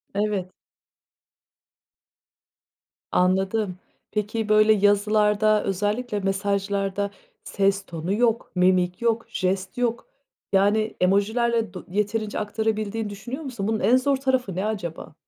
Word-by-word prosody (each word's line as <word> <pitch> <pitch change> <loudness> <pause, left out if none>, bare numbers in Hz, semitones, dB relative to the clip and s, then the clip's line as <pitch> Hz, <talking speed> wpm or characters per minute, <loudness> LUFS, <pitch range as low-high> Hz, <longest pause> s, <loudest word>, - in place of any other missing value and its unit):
Evet. 200 -3 -1 2.6
Anladım. 190 +1 +1 0.3
Peki, 215 +1 -2
böyle 215 0 +6
yazılarda, 210 +1 +3
özellikle 210 +4 -1
mesajlarda 200 0 -1 0.3
ses 195 0 0
tonu 170 +2 -3
yok, 230 +1 +1
mimik 180 0 +2
yok, 230 -1 +1
jest 185 +2 -2
yok, 235 -1 -1 0.5
yani, 210 +3 +2
emojilerle 220 +4 +1
do 180 - -8
yeterince 210 +1 -1
aktarabildiğini 215 0 -2
düşünüyor 240 +9 -7
musun? 235 -7 -4
Bunun 220 0 0
en 245 +3 +4
zor 275 +1 +1
tarafı 260 -7 0
ne 190 +2 -1
acaba? 175 -8 -4
210 Hz, 105 wpm, -24 LUFS, 195-220 Hz, 2.6 s, böyle